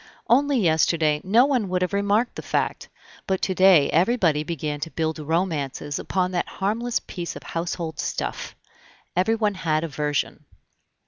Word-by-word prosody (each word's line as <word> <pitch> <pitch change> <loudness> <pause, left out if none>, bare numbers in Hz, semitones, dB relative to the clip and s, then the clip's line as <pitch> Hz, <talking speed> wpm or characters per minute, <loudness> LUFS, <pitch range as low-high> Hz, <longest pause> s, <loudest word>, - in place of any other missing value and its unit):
Only 275 +4 +3
yesterday 160 -4 +2
no 225 +7 +5
one 250 -9 0
would 180 0 0
have 180 - -2
remarked 205 +4 +1
the - - -7
fact, - - -2 0.4
but 190 -1 0
to 190 - +1
day 185 -6 +6
everybody 175 -4 +2
began 150 -2 -4
to 165 - -4
build 160 -1 -2
romances 150 -3 -2
upon 185 -1 -1
that 175 -1 -1
harmless 225 +5 0
piece 175 -2 -6
of - - -9
household 165 -1 -4
stuff. - - -4 0.6
Everyone 210 +3 +2
had 160 -4 -1
a - - -2
version. 145 -1 -2
180 Hz, 150 wpm, -24 LUFS, 155-200 Hz, 0.6 s, day